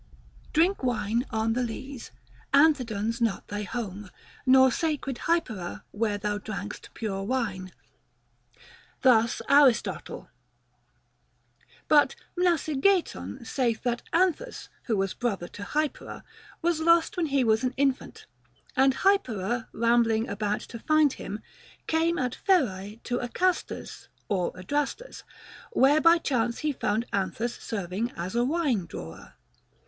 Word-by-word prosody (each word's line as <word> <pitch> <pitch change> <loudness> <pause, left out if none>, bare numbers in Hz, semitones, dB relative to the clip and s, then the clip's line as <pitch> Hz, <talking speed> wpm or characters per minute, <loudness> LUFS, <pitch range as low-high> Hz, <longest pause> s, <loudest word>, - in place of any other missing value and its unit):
Drink 345 +6 +2
wine 230 0 0
on 220 -1 0
th' - - -3
lees, 250 +1 -4 0.5
Anthedon's 240 -7 +2
not 225 -4 0
thy 205 0 -3
home, 210 -2 -5 0.4
Nor 260 0 +7
sacred 290 -4 -2
Hypera 235 - -1
where 210 -1 -1
thou 205 0 -2
drank'st 210 -1 -7
pure 200 -4 -3
wine. 195 -5 -2 1.3
Thus 230 -3 +4
Aristotle; 280 -5 +3 1.6
but 295 -1 +5 0.2
Mnasigeiton 320 - +1
saith 235 -3 -1
that 240 -1 -1
Anthus, 375 +8 0 0.2
who 225 -4 0
was 195 -1 0
brother 205 -8 -2
to 205 - -11
Hypera, 295 +8 -3 0.4
was 340 -1 +1
lost 335 +4 +3
when 345 -3 0
he 275 -2 +2
was 220 0 +2
an 255 0 -1
infant, 275 -1 -1 0.5
and 265 0 +4
Hypera 240 - +1
rambling 230 -1 +2
about 205 +1 -2
to 230 - -9
find 310 0 +3
him, 210 +2 -7 0.4
came 330 +1 +1
at 250 -2 -1
Pherae 215 - +1
to 245 0 -2
Acastus 360 +9 -2 0.2
(or 185 -4 0
Adrastus), 290 - -3 0.5
where 290 +1 +5
by 335 +1 +6
chance 245 -7 0
he 300 - +2
found 220 -2 -1
Anthus 210 +4 -1
serving 200 +2 -3
as 180 +5 -4
a 240 - +3
wine 265 - 0
drawer. 80 - -9
240 Hz, 125 wpm, -27 LUFS, 210-295 Hz, 1.6 s, Nor